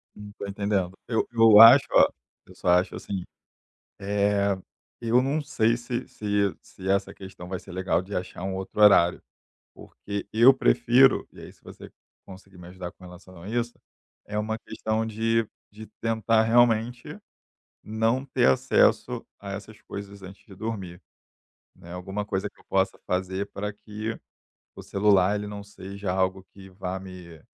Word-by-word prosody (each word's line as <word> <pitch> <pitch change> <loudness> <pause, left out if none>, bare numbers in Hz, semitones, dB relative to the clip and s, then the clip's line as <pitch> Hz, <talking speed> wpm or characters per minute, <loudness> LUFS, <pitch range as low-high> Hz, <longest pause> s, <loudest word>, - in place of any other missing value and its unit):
Hum, 105 0 -10
estou 100 - -8
entendendo. 100 -2 -2
Eu 115 -2 0
eu 115 -2 +7
acho, 120 +5 +10
olha, - - +6 0.4
eu - - -17
só - - -2
acho 90 +1 +3
assim, 95 -3 -5 0.8
eh, 100 0 +1 0.4
eu 120 +1 +2
não 140 +4 0
sei 115 -5 +1
se 120 0 -5
se 100 -2 -1
se 95 0 -10
essa 100 0 0
questão 95 -2 -11
vai 95 - -4
ser - - -13
legal 90 -2 0
de 100 +2 -9
achar 90 -1 -5
um 95 0 -3
outro 95 +2 -6
horário, 95 -4 +5 0.5
porque 100 -1 -7
eu 120 +5 +7
prefiro, 130 0 +4
e - - -14
aí - - -11
se - - -29
você - - -12 0.3
conseguir 95 0 -14
me 90 0 -11
ajudar 90 -1 -7
com 95 - -18
relação 90 -1 -13
a 100 - -9
isso, 120 +1 -3 0.5
é 105 0 -4
uma 110 +1 -2
questão 110 0 -3
de 115 +1 0 0.2
de 110 +1 -11
tentar 115 0 +2
realmente 120 +1 +2 0.6
não 115 +5 0
ter 135 - +1
acesso 65 - +2
a 100 - -8
essas 105 +2 -9
coisas 100 0 -9
antes 95 +1 -12
de 100 - -13
dormir, 95 -4 -6 0.8
né. 85 +1 -13
Alguma 95 +3 -5
coisa 100 0 -2
que - - -33
eu - - -22
possa 95 0 0
fazer 95 +2 -2
para 105 +1 -4
que 105 +2 -6 0.6
o - - -10
celular 100 -1 +3
ele 105 - -4
não 105 0 -7
seja 100 -1 -6
algo 95 0 -1
que 95 -1 -13
vá 95 0 -5
me, 90 -4 -11
100 Hz, 165 wpm, -26 LUFS, 95-110 Hz, 0.8 s, acho